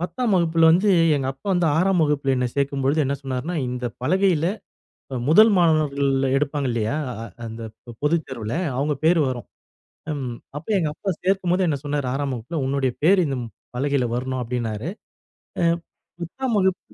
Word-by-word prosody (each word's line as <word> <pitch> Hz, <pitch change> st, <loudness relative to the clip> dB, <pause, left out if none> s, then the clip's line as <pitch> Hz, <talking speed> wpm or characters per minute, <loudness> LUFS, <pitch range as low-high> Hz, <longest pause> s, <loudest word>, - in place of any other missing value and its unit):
10ஆம் 225 Hz, +6 st, -1 dB
வகுப்புல 165 Hz, -2 st, +4 dB
வந்து 185 Hz, +6 st, +3 dB, 0.3 s
எங்க 135 Hz, -2 st, -1 dB
அப்பா 135 Hz, +8 st, -20 dB
வந்து 175 Hz, -2 st, +2 dB
6ஆம் 185 Hz, +1 st, +3 dB
வகுப்புல 145 Hz, -3 st, +1 dB
என்ன 125 Hz, 0 st, +1 dB
சேர்க்கும்பொழுது 140 Hz, +1 st, +1 dB
என்ன 135 Hz, +1 st, 0 dB
சொன்னாருனா, 135 Hz, +5 st, -3 dB
இந்த 125 Hz, 0 st, -3 dB, 0.2 s
பலகையில 180 Hz, +1 st, +2 dB, 0.7 s
அ -, -, -2 dB
1 215 Hz, +8 st, +7 dB
மாணவர்கள் 155 Hz, -5 st, +2 dB, 0.3 s
எடுப்பாங்க 145 Hz, 0 st, 0 dB
இல்லையா? 115 Hz, +2 st, -1 dB, 0.5 s
அந்த 115 Hz, +1 st, -7 dB, 0.2 s
பொ -, -, -9 dB
பொதுத்தேர்வுல 135 Hz, -8 st, -1 dB, 0.2 s
அவங்க 145 Hz, +3 st, 0 dB
பேர் 170 Hz, +2 st, +5 dB
வரும். 125 Hz, -2 st, -5 dB, 0.7 s
ம் 130 Hz, -5 st, -4 dB, 0.2 s
அப்போ 160 Hz, +8 st, -7 dB
எங்க 160 Hz, -, 0 dB
அப்பா 195 Hz, +5 st, -3 dB
சேர்க்கும்போது 185 Hz, -1 st, +1 dB
என்ன 145 Hz, -3 st, 0 dB
சொன்னாரு. 145 Hz, -2 st, -1 dB
6ஆம் 140 Hz, 0 st, -1 dB
வகுப்புல 125 Hz, +8 st, -5 dB
உன்னுடைய 135 Hz, -2 st, 0 dB
பேரு 185 Hz, +4 st, +5 dB
இந்த 135 Hz, -2 st, -2 dB, 0.4 s
பலகையில 135 Hz, -1 st, +1 dB
வரணும் 130 Hz, +1 st, -2 dB
அப்படின்னாரு. 115 Hz, +1 st, -3 dB, 0.7 s
அ. -, -, +2 dB, 0.6 s
10ஆம் 235 Hz, +8 st, -2 dB
வகுப்பு 190 Hz, -1 st, -1 dB
145 Hz, 150 wpm, -23 LUFS, 130-170 Hz, 0.7 s, 1